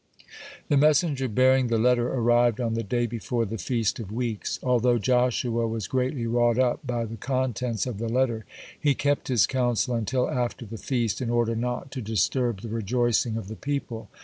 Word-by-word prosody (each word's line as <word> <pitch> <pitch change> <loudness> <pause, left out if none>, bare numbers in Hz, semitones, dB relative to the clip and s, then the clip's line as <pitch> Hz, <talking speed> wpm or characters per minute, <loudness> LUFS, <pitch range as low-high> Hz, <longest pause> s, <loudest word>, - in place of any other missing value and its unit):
The 145 - +3
messenger 145 -2 +3
bearing 130 +3 +3
the 115 -1 +1
letter 120 +1 +2
arrived 120 -1 +3
on 115 -2 -1
the 115 - -1
day 120 +2 -1
before 115 +1 -2
the 110 +1 -5
Feast 115 +4 -1
of 105 -4 -7
Weeks. 115 -2 -3
Although 125 -1 +3
Joshua 120 0 +1
was 110 -2 -3
greatly 130 -1 -1
wrought 120 0 +2
up 125 -1 +2
by 120 -2 -1
the 115 +1 -7
contents 125 -2 -1
of 120 -5 -5
the 115 0 -2
letter, 120 -2 0 0.4
he 145 -3 +2
kept 145 +1 0
his 120 -9 +4
counsel 125 -1 0
until 120 +3 0
after 120 -1 -2
the 110 +1 -8
feast, 120 -5 -1
in 120 - -2
order 120 -1 +1
not 125 +3 -3
to 130 - -5
disturb 110 +1 0
the 115 - -7
rejoicing 115 +1 0
of 110 -4 -6
the 110 - -7
people. 120 -6 -4
120 Hz, 185 wpm, -26 LUFS, 115-125 Hz, 0.4 s, his